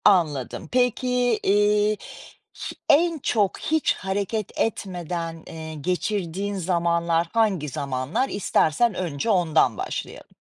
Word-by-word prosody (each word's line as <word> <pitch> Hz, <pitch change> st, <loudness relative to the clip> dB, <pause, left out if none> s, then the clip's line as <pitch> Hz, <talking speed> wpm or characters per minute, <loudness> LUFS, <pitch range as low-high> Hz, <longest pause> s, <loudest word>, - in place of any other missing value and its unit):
Anladım. 155 Hz, -10 st, +2 dB
Peki, 250 Hz, -1 st, +2 dB
iii, 210 Hz, +1 st, +3 dB, 0.6 s
hi -, -, -6 dB
en 330 Hz, +2 st, +4 dB
çok 210 Hz, -7 st, +1 dB
hiç 315 Hz, -1 st, +1 dB
hareket 200 Hz, +2 st, -3 dB
etmeden, 175 Hz, -5 st, -3 dB
eee, 160 Hz, -1 st, -7 dB
geçirdiğin 185 Hz, +4 st, -2 dB
zamanlar 170 Hz, -2 st, +1 dB
hangi 200 Hz, -10 st, +1 dB
zamanlar? 140 Hz, -, -2 dB
İstersen 200 Hz, +2 st, +2 dB
önce 175 Hz, 0 st, -3 dB
ondan 170 Hz, -6 st, +3 dB
başlayalım. -, -, -5 dB
190 Hz, 105 wpm, -24 LUFS, 165-215 Hz, 0.6 s, en